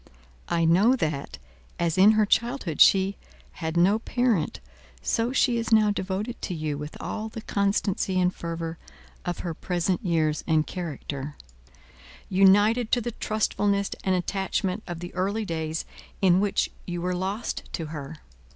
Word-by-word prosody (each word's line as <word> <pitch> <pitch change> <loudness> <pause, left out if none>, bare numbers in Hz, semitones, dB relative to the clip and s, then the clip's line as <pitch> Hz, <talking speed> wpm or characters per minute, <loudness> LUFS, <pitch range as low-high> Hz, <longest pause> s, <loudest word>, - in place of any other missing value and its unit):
I 170 -1 +2
know 195 +10 +5
that, 155 - -3 0.4
as 170 -2 0
in 195 +3 +7
her 215 -1 +4
childhood 235 - 0
she 195 +1 +5 0.3
had 160 0 -4
no 195 +5 +4
parent, 235 -8 0 0.4
so 230 +2 0
she 250 -2 +2
is 230 0 -3
now 215 -2 +5
devoted 200 +4 -3
to 180 - -3
you 155 -2 -2
with 150 +1 -7
all 220 0 -4
the 220 0 -8
constancy 200 -2 0
and 180 0 +2
fervour 165 -1 -5 0.5
of 175 -1 -3
her 170 - -2
present 175 +2 -1
years 160 -4 +1
and 155 -2 +3
character, 150 -4 -5 0.9
united 205 +5 +4
to 245 - +4
the 240 - -3
trustfulness 205 -2 0
and 190 -1 +2
attachment 190 +2 -1
of 175 -2 -5
the 175 - -7
early 200 +4 -1
days 160 -2 -3 0.3
in 185 -2 +4
which 200 0 +1 0.2
you 175 -1 -3
were 180 +1 -1
lost 195 +5 -3
to 165 - -3
her. 145 +1 -6
185 Hz, 150 wpm, -26 LUFS, 165-210 Hz, 0.9 s, in